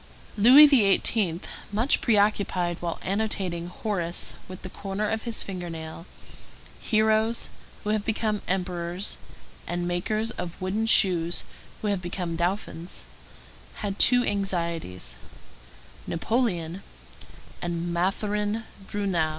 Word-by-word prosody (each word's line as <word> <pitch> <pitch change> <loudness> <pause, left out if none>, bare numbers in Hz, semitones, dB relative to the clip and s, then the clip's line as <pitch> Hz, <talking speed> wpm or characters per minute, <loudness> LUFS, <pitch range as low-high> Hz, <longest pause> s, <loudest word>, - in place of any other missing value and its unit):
Louis 250 +8 +9
XVIII., 200 - +3 0.3
much 225 +7 +2
preoccupied 200 -5 +2
while 170 -1 -3
annotating 190 -4 -1
Horace 180 -2 -2
with 185 0 -10
the 185 - -6
corner 200 +1 -3
of 220 +1 -1
his 230 - +1
finger 180 -3 -5
nail, 160 +1 -7 0.7
heroes 220 +1 +2 0.3
who 210 - 0
have 215 -1 +1
become 215 -1 -1
emperors, 180 0 -1 0.5
and 175 0 -2
makers 215 +6 -1
of 180 -5 -6
wooden 200 +4 -1
shoes 175 -6 +4 0.4
who - - 0
have 200 -3 0
become 175 -1 -3
dauphins, 175 0 -3 0.7
had 200 -2 -4
two 245 0 +6
anxieties,—Napoleon 170 - -3 0.8
and 170 0 -2
Mathurin 205 +4 0 0.2
Bruneau. 190 -6 0
190 Hz, 105 wpm, -26 LUFS, 175-215 Hz, 0.8 s, Louis